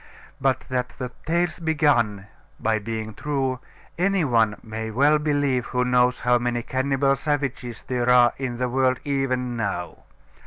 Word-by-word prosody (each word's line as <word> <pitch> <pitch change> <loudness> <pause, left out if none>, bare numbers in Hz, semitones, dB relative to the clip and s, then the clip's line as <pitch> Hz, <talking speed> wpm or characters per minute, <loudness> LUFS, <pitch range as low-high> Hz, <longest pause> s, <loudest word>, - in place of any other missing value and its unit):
But 135 -1 +2
that 125 -1 -3
the 125 -1 -4 0.2
tales 175 +2 0
began 145 - +1 0.3
by 110 -1 +1
being 110 0 -5
true 135 0 -2 0.4
any 190 -2 +2
one 115 -5 +2
may 110 0 -5
well 145 +7 +3
believe 145 -4 0
who 125 0 0
knows 125 0 +2
how 125 0 +3
many 120 0 -1
cannibal 135 +2 +1
savages 135 -4 -3
there 125 -1 -1
are 125 -1 +6
in 130 -3 -3
the 125 +1 0
world 130 0 +1
even 130 -3 -1
now. 100 -6 -3
125 Hz, 150 wpm, -24 LUFS, 120-140 Hz, 0.4 s, are